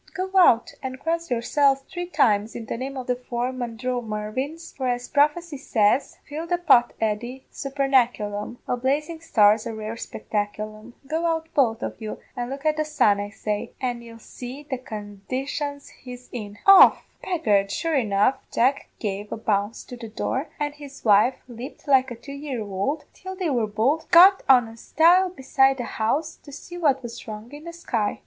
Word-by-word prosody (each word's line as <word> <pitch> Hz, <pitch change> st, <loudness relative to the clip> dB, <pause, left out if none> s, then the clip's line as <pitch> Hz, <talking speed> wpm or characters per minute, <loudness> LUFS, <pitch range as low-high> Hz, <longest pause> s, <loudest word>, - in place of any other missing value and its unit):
Go 375 Hz, 0 st, -3 dB
out 280 Hz, -10 st, +5 dB
and 260 Hz, -1 st, -5 dB
cross 335 Hz, +2 st, -2 dB
yourselves 270 Hz, +3 st, +2 dB
three 350 Hz, +5 st, -6 dB
times 220 Hz, -, +2 dB
in 230 Hz, -, -6 dB
the -, -, -4 dB
name 265 Hz, +3 st, -5 dB
o' 260 Hz, -, -3 dB
the 250 Hz, 0 st, -1 dB
four 245 Hz, 0 st, -3 dB
Mandromarvins, 245 Hz, +4 st, -4 dB
for 260 Hz, -2 st, -2 dB
as 245 Hz, 0 st, -1 dB
prophecy 300 Hz, +2 st, +1 dB
says: 235 Hz, -1 st, +1 dB
Fill 310 Hz, +3 st, -5 dB
the 350 Hz, +1 st, +1 dB
pot, 280 Hz, -9 st, +4 dB
Eddy, 235 Hz, +4 st, -2 dB
supernaculum 245 Hz, -6 st, 0 dB
a -, -, +1 dB
blazing 300 Hz, +6 st, -1 dB
star's 215 Hz, -8 st, +4 dB
a 225 Hz, -, -5 dB
rare 215 Hz, 0 st, -5 dB
spectaculum. 215 Hz, 0 st, -5 dB
Go 320 Hz, +4 st, -1 dB
out 325 Hz, -1 st, -1 dB
both 235 Hz, -5 st, +2 dB
of -, -, -5 dB
you 215 Hz, -1 st, -5 dB, 0.2 s
and 245 Hz, 0 st, -3 dB
look 275 Hz, +2 st, -7 dB
at 310 Hz, 0 st, +2 dB
the 310 Hz, -, +1 dB
sun, 215 Hz, -10 st, +2 dB
I 205 Hz, 0 st, -4 dB
say, 210 Hz, 0 st, -4 dB
an' 245 Hz, -2 st, -2 dB
ye'll 230 Hz, -1 st, -12 dB
see 250 Hz, +5 st, -9 dB
the 270 Hz, -4 st, -4 dB
condition 255 Hz, +7 st, -5 dB, 0.2 s
he's 250 Hz, -1 st, -10 dB
in 205 Hz, -4 st, -7 dB
off!' 390 Hz, -1 st, +8 dB, 0.2 s
"Begad, 210 Hz, -, +1 dB
sure 330 Hz, +9 st, -2 dB
enough, 230 Hz, 0 st, +2 dB
Jack 260 Hz, +4 st, +1 dB
gave 205 Hz, -1 st, -4 dB
a -, -, -3 dB
bounce 205 Hz, 0 st, -1 dB
to 250 Hz, -, -9 dB
the 230 Hz, -2 st, -8 dB
door, 260 Hz, +6 st, -2 dB
and 290 Hz, 0 st, -1 dB
his 285 Hz, -3 st, -12 dB
wife 215 Hz, +4 st, +5 dB
leaped 250 Hz, +5 st, -10 dB
like 265 Hz, -2 st, +4 dB
a 240 Hz, -, -6 dB
two 240 Hz, +5 st, -11 dB
year 280 Hz, -4 st, -5 dB
ould, 210 Hz, +9 st, -2 dB
till 375 Hz, +1 st, -8 dB
they 365 Hz, -5 st, -1 dB
were 235 Hz, -5 st, +1 dB
both 235 Hz, +10 st, 0 dB
got 370 Hz, +3 st, +8 dB
on 250 Hz, -3 st, +6 dB
a 225 Hz, 0 st, -12 dB
stile 350 Hz, +9 st, +4 dB
beside 270 Hz, -4 st, +2 dB
the 245 Hz, -, -3 dB
house 285 Hz, +9 st, -1 dB
to 285 Hz, -, -14 dB
see 350 Hz, +5 st, -10 dB
what 285 Hz, -6 st, +1 dB
was 235 Hz, 0 st, -8 dB
wrong 215 Hz, +2 st, -8 dB
in 295 Hz, +2 st, -11 dB
the 340 Hz, -, -6 dB
sky. 230 Hz, -11 st, -2 dB
255 Hz, 185 wpm, -24 LUFS, 220-295 Hz, 0.2 s, off